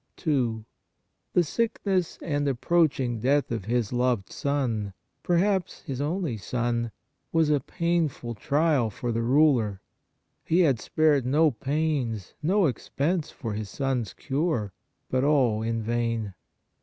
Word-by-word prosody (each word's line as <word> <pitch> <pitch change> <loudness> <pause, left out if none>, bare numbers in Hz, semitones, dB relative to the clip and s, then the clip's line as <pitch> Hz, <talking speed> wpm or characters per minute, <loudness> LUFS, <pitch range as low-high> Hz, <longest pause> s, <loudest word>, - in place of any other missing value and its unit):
2. 120 - 0 0.7
The 180 - +4
sickness 190 -1 -1
and 145 -3 0
approaching 135 -3 +1
death 140 +4 +2
of 110 -5 -3
his 120 0 0
loved 120 -5 0
son, 120 -8 -1 0.3
perhaps 185 +1 +1
his 135 -1 -4
only 155 - -1
son, 120 +2 -1 0.4
was 160 -2 +3
a 145 - +3
painful 160 -5 -1
trial 145 +1 +1
for 120 +4 -4
the 115 0 0
ruler. 120 -6 +3 0.6
He 170 +3 +3
had 140 -9 +3
spared 150 +1 +2
no 150 +5 +3
pains, 135 - -2
no 190 +5 +3
expense 155 +4 -1
for 115 -4 -5
his 105 -1 -4
son 135 +1 -1
s 105 -5 -7
cure, 135 - -1 0.3
but 130 0 0
all 130 -7 +3
in 115 0 -1
vain. 115 -2 -1
135 Hz, 130 wpm, -26 LUFS, 115-155 Hz, 0.7 s, The